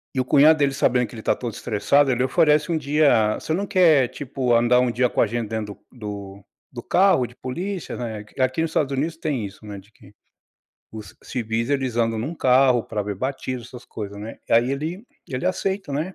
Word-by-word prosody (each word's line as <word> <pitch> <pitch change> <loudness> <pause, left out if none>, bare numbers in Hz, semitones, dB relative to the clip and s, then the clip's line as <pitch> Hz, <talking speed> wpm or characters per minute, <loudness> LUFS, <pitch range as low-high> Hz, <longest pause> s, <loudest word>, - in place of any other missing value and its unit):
e - - 0
o 130 - +1
cunhado 155 +2 +5
dele 140 -2 +1
sabendo 125 -2 +2
que - - -16
ele 110 - -8
está - - +1
todo 120 -4 -5
estressado, 135 +6 +2
ele 125 0 +1
oferece 150 +2 +2
um 165 - +1
dia: 140 -7 +3
"Você 160 - -3
não 200 +3 -2
quer, 160 -9 +4
tipo, 130 -3 -2
andar 120 +1 +4
um 125 -1 +2
dia 125 0 +1
com - - 0
a - - +3
gente 115 0 -3
dentro 110 -2 -5
do 100 -4 -8 0.3
do 120 -2 -8
carro 180 -10 +3
de 120 - -18
polícia," 180 +8 -5
né. 110 -3 -5
Aqui 130 +4 +1
no 165 - +2
Estados 145 -3 -1
Unidos 160 +4 -2
tem 140 -10 -2
isso, 100 +2 -11
né, 105 -1 -7
de 100 +3 -20
que 100 0 -19 0.8
os 105 -5 -10
civis 115 0 -3
eles 130 -4 -1
andam 115 -1 +1
em 110 - -2
um 160 +6 -4
carro 130 -3 +4
para 105 -2 -4
ver 100 0 -4
batismo 130 +2 -4
essas 120 +1 -12
coisa, 100 -2 -7
né. 110 +2 -8
Aí, 120 +3 +4
ele 165 - -5 0.2
ele 130 +7 -3
aceita, 190 -3 -2
né. 160 +7 -3
125 Hz, 215 wpm, -23 LUFS, 115-150 Hz, 0.8 s, cunhado